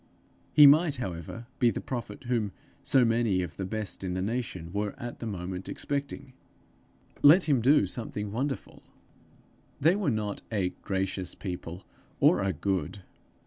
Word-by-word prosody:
He 150 - +8
might, 150 +1 +6
however, 95 - -6
be 120 - +5
the - - -2
prophet 120 -4 -6
whom 115 -6 -1 0.3
so 130 -2 +4
many 115 -5 +2
of 85 -2 -7
the 95 - -3
best 105 -1 -4
in 90 -1 -2
the 90 - -1
nation 100 -6 -4
were 105 +2 -2
at 120 -2 -6
the 115 - -5
moment 90 -2 -5
expecting! 140 -2 -4 0.9
Let 160 +6 +8
him 140 -6 +2
do 140 +6 +5
something 105 -3 -5
wonderful! 135 +5 -4 1.0
They 165 +6 +4
were 200 -7 0
not 105 -4 -2
a 100 -4 +1
gracious 95 -1 -2
people, 90 -1 -6 0.3
or - - +5
a 95 0 +1
good. 95 +1 -2
110 Hz, 150 wpm, -28 LUFS, 95-130 Hz, 1.0 s, He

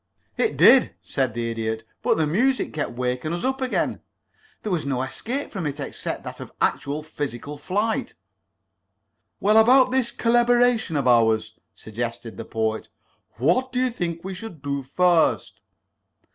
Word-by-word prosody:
"It - - 0
did," - - +6
said - - -1
the 115 -1 -2
Idiot. 110 0 -3 0.2
"But - - +2
the 160 - +2
music 245 - +1
kept 150 -5 -3
waking 125 +5 -2
us 175 - -3
up 265 +1 -1
again. 255 -1 -1 0.6
There 215 - -3
was 175 -4 0
no 130 -2 -1
escape 250 - -4
from 180 -7 -3
it 145 0 -5
except 140 - -4
that - - -8
of - - -9
actual 145 +2 -1
physical 145 -1 -5
flight." 205 +9 -2 1.2
"Well, 210 +2 +4
about 255 +3 +6
this 260 -2 +1
collaboration 240 -5 +2
of 140 -3 0
ours," 110 -2 +3 0.2
suggested 115 +1 -6
the - - -7
Poet. 110 -1 -2 0.4
"What 175 - +1
do 250 - -4
you 255 -1 +1
think 170 -6 -4
we 190 +1 -5
should 185 -7 -9
do 140 -1 -2
first?" 170 +5 +1
160 Hz, 155 wpm, -24 LUFS, -, 1.2 s, did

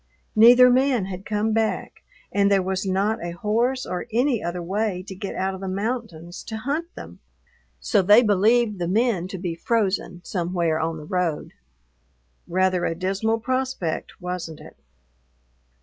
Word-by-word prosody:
Neither 245 +3 +8
man 255 -4 +2
had 190 0 -7
come 215 +1 0
back 220 0 -2 0.3
and 200 0 +3
there 195 -1 +3
was 190 +1 -2
not 195 +2 0
a 175 0 -4
horse 235 +7 0
or 180 - -4
any 245 +1 +1
other 175 +1 -3
way 190 +1 -2
to 195 - -7
get 195 +1 -6
out 190 +1 -1
of 190 - -8
the 195 - -4
mountains 195 -4 -4
to 220 - -5
hunt 295 +9 -3
them, - - -10 0.6
so 205 - +2
they 205 +6 +6
believed 210 +1 +3
the 175 - -1
men 200 -2 +1
to 190 - -6
be 175 -2 -3
frozen 185 -2 -1
somewhere 170 -3 -1
on 160 0 -2
the 150 - -9
road. 175 -2 -2 0.9
Rather 185 0 +1
a 165 - -1
dismal 195 +5 -1
prospect, 255 -9 -3
wasn't 180 -3 -5
it? - - -14
195 Hz, 160 wpm, -23 LUFS, 180-225 Hz, 0.9 s, Neither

